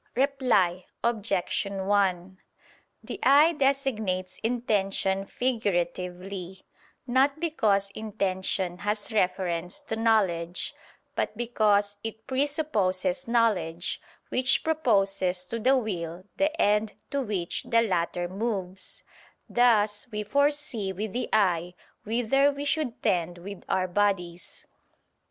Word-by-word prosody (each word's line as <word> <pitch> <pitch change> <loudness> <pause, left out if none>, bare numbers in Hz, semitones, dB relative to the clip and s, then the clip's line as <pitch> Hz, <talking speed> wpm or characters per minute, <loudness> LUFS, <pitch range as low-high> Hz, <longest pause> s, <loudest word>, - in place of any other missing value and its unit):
Reply 240 -10 +2 0.2
Obj. 210 -5 0
1: 190 -2 0 0.7
The - - -6
eye 295 +5 +6
designates 220 - 0
intention 195 -4 0
figuratively, 185 -5 -2 0.4
not 270 +4 +2
because 210 -12 +1
intention 190 -4 -1
has 210 +2 -2
reference 180 -4 0
to 225 - -4
knowledge, 190 -7 +1 0.4
but 210 - -2
because 210 -4 +1
it 220 0 -6
presupposes 270 -3 0
knowledge, 190 -8 +1 0.3
which 255 +1 +2
proposes 195 - +1
to 230 +5 -4
the 260 +4 +4
will 180 -7 -4
the 305 +2 0
end 210 +1 +2 0.2
to 280 -1 0
which 200 -8 -2
the 230 0 +2
latter 175 -3 -1
moves; 190 -2 -4 0.4
thus 215 -4 +3
we 210 0 -3
foresee 285 -4 0
with 200 +2 -4
the 245 0 -2
eye 180 -4 +2 0.3
whither 245 +6 +3
we 285 +1 -5
should 285 -5 -1
tend 175 -4 +1
with 195 +3 -9
our 185 -1 +1
bodies. 180 -2 -1
205 Hz, 105 wpm, -27 LUFS, 185-245 Hz, 0.7 s, eye